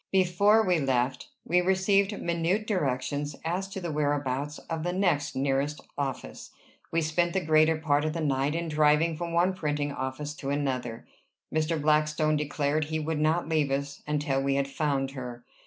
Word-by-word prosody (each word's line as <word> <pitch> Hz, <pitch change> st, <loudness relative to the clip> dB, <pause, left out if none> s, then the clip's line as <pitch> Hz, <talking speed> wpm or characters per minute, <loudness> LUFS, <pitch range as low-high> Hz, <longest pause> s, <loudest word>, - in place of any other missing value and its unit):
Before 200 Hz, +4 st, +4 dB
we 180 Hz, -3 st, +3 dB
left, 130 Hz, -2 st, 0 dB, 0.2 s
we 180 Hz, +1 st, +3 dB
received 195 Hz, +2 st, +2 dB
minute 170 Hz, +5 st, 0 dB
directions 145 Hz, -, -1 dB
as 180 Hz, +4 st, -1 dB
to 195 Hz, -, -5 dB
the 175 Hz, -3 st, -4 dB
whereabouts 145 Hz, -1 st, -1 dB
of 165 Hz, -1 st, -5 dB
the 175 Hz, +2 st, -2 dB
next 170 Hz, -6 st, +1 dB
nearest 140 Hz, +2 st, 0 dB, 0.2 s
office. 135 Hz, -, -4 dB, 0.4 s
We 165 Hz, -, +1 dB
spent 170 Hz, +2 st, +1 dB
the 190 Hz, -4 st, -1 dB
greater 155 Hz, 0 st, +4 dB
part 150 Hz, -2 st, +1 dB
of 155 Hz, -, -1 dB
the 165 Hz, -, -3 dB
night 140 Hz, -1 st, 0 dB
in 170 Hz, 0 st, -2 dB
driving 155 Hz, +1 st, +3 dB
from 170 Hz, +2 st, -4 dB
one 175 Hz, +3 st, +3 dB
printing 145 Hz, -4 st, -2 dB
office 140 Hz, +2 st, -4 dB
to 135 Hz, -, -5 dB
another. 130 Hz, -5 st, -2 dB, 0.5 s
Mr. 155 Hz, +1 st, +1 dB
Blackstone 155 Hz, +1 st, +2 dB
declared 150 Hz, 0 st, 0 dB
he 155 Hz, +1 st, -2 dB
would 155 Hz, 0 st, -2 dB
not 155 Hz, +2 st, +1 dB
leave 155 Hz, -3 st, +1 dB
us 140 Hz, +1 st, -3 dB
until 145 Hz, -2 st, 0 dB
we 135 Hz, 0 st, +1 dB
had 140 Hz, 0 st, +1 dB
found 140 Hz, -1 st, -1 dB
her. 125 Hz, -3 st, -7 dB
150 Hz, 170 wpm, -28 LUFS, 140-170 Hz, 0.5 s, Before